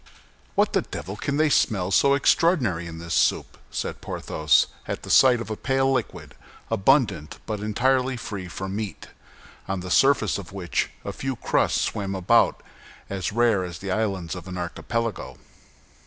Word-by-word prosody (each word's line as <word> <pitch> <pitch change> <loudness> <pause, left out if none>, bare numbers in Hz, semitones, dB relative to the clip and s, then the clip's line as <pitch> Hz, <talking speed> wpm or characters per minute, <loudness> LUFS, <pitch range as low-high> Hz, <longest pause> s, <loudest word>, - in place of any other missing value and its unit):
"What - - +2
the - - +3
devil 95 +6 -7
can 140 +6 -2
they 155 -1 +3
smell 95 -9 +2
so 140 +7 +4
extraordinary 130 - +2
in 80 -1 -8
this 85 0 -5
soup?" - - +1
said - - -4
Porthos, 75 -3 +2 0.2
at - - -4
the - - -5
sight 125 -2 +6
of 115 - -6
a - - -1
pale 135 +3 +1
liquid, 130 -4 -4 0.4
abundant 100 - +2
but 105 -1 -3
entirely 130 +5 +1
free 100 -5 -6
from 95 +2 -5
meat, 105 -2 -5 0.6
on 95 -1 -2
the 90 0 -6
surface 135 -6 +3
of 95 -2 -10
which 95 -4 -2 0.2
a 100 - -4
few 135 +4 -3
crusts - - +1
swam 100 -1 -2
about 95 -2 +3 0.5
as 95 -2 -2
rare 115 -3 +2
as 90 -2 -6
the 95 +2 -5
islands 95 -5 -1
of 90 0 -8
an 90 0 -6
archipelago. 115 +5 -3
100 Hz, 165 wpm, -24 LUFS, 90-125 Hz, 0.6 s, sight